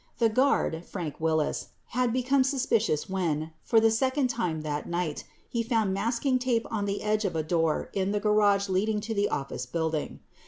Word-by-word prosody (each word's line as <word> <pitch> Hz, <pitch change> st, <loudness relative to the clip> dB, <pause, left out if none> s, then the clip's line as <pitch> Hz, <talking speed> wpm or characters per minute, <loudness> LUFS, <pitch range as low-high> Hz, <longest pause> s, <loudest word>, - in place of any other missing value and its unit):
4 230 Hz, -1 st, +3 dB
The -, -, -8 dB
guard, 255 Hz, -, +2 dB
Frank 170 Hz, -5 st, -6 dB
Wills, 160 Hz, -1 st, 0 dB, 0.2 s
had 250 Hz, 0 st, +1 dB
become 255 Hz, +2 st, +2 dB
suspicious 240 Hz, -, +1 dB
when, 165 Hz, -5 st, -1 dB
for 225 Hz, -, +4 dB
the 225 Hz, 0 st, +4 dB
second 260 Hz, +3 st, +1 dB
time 180 Hz, -10 st, -2 dB
that 150 Hz, -1 st, -4 dB
night, 170 Hz, -3 st, -2 dB, 0.2 s
he 235 Hz, -, -1 dB
found 225 Hz, -4 st, +1 dB
masking 235 Hz, +6 st, 0 dB
tape 245 Hz, -2 st, 0 dB
on 210 Hz, -3 st, -1 dB
the 200 Hz, 0 st, -2 dB
edge 215 Hz, 0 st, +1 dB
of 185 Hz, -5 st, -1 dB
a 160 Hz, -, 0 dB
door 165 Hz, -1 st, 0 dB
in 195 Hz, 0 st, 0 dB
the 205 Hz, -, 0 dB
garage 205 Hz, -1 st, +3 dB
leading 205 Hz, +3 st, +1 dB
to 225 Hz, +1 st, -3 dB
the 205 Hz, -1 st, +1 dB
office 135 Hz, -2 st, -3 dB
building. 160 Hz, +1 st, -2 dB
205 Hz, 190 wpm, -28 LUFS, 165-230 Hz, 0.2 s, for